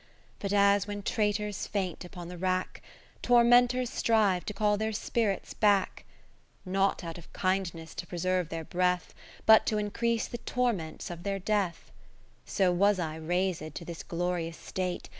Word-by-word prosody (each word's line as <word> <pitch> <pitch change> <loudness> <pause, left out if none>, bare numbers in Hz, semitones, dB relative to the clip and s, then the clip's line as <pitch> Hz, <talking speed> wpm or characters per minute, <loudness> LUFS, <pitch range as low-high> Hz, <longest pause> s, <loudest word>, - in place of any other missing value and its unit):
But 200 - -3
as 200 0 +4
when 205 0 -5
traitors 210 -1 -1
faint 190 -4 -3
upon 175 -1 -9
the 180 0 -8
rack, 185 0 -1 0.4
Tormenters 245 +1 +4
strive 210 -8 +2
to 210 - -4
call 210 -1 +2
their 220 +1 -2
spirits 210 -1 -1
back; 205 -3 +2 0.6
Not 195 +1 +1
out 165 0 -6
of 170 - -16
kindness 185 -4 -1
to 175 - -6
preserve 180 -1 -1
their 165 -1 -4
breath. 180 +1 0 0.3
But 220 0 +7
to 215 - +1
increase 225 +2 0
the 240 - -6
torments 230 -12 -2
of 170 -1 -7
their 195 +2 -2
Death: 195 - -1 0.6
So 185 -2 +2
was 200 +3 +3
I 160 -3 -3
raised 170 -1 -1
to 170 - -6
this 170 -1 -6
glorious 170 -1 -2
state. 180 +1 -4
190 Hz, 155 wpm, -29 LUFS, 175-210 Hz, 0.6 s, But